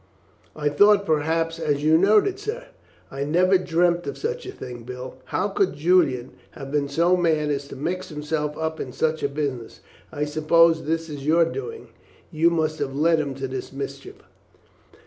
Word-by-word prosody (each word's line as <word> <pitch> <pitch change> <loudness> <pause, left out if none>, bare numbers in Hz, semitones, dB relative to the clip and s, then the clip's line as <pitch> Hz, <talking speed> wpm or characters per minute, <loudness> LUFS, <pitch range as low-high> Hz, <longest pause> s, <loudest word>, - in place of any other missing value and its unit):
"I 150 -1 0
thought 200 +6 +5
perhaps 165 +1 0
as 145 -3 -1
you 155 +1 +5
knowed 200 +5 +5
it, 400 0 -3
sir." 475 +4 -5 0.4
"I 135 +1 -3
never 180 +5 +3
dreamt 175 0 +1
of - - -4
such 475 -1 -4
a - - -5
thing, 125 - -9
Bill. 125 +2 -8
How 190 - -1
could 195 -1 +1
Julian 145 -6 +2 0.2
have 135 0 -9
been 145 -1 0
so 170 +5 +3
mad 160 -4 +1
as 140 -1 -3
to - - -9
mix 175 +7 -3
himself 150 -1 -3
up 160 0 -3
in 125 - -5
such 160 0 0
a 140 - 0
business? 140 -5 -4 0.3
I 150 - -2
suppose 160 +1 +3
this 165 +1 -1
is 145 -2 -7
your 165 +2 +5
doing; 445 - -6 0.4
you 165 +1 +3
must 155 -2 -1
have 135 - -3
led 160 +2 +3
him 140 -3 -2
into 135 0 -4
this 130 0 -6
mischief." 140 0 -7
160 Hz, 185 wpm, -23 LUFS, 145-175 Hz, 0.4 s, thought